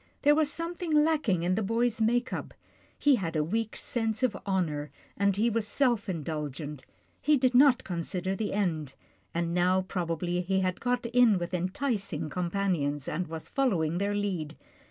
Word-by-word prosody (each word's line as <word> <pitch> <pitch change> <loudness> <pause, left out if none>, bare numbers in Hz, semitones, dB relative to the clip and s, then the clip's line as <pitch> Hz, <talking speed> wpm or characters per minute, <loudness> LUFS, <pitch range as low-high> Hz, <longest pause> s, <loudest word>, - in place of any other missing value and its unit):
There 295 0 +6
was 300 -1 +2
something 335 +1 -4
lacking 300 - +3
in 180 +1 +1
the 220 - 0
boy's 230 +2 0
make 240 +3 +1
up. - - -5 0.4
He 285 -3 +4
had 170 -5 -3
a 155 - +2
weak 220 +7 -2
sense 225 -1 -2
of 240 -6 +2
honour, 155 -7 -1 0.3
and 200 0 +2
he 215 +4 +2
was 225 -2 0
self 240 -3 +1
in 165 -5 -3
dulgent. 150 -2 -5 0.4
He 300 0 +4
did 255 -1 +2
not 260 0 +6
consider 180 +2 -3
the 210 +1 -2
end, 160 -9 -1 0.4
and 170 0 -1
now 180 +1 +3
probably 175 -1 -2
he 190 +1 0
had 185 -1 -1
got 245 0 0
in 235 -3 +4
with 175 0 -4
enticing 185 - -2
companions, 170 -6 -1
and 175 +3 -2
was 160 0 -7
following 175 - +1
their 200 +1 0
lead. 180 -7 -2
195 Hz, 175 wpm, -29 LUFS, 170-235 Hz, 0.4 s, There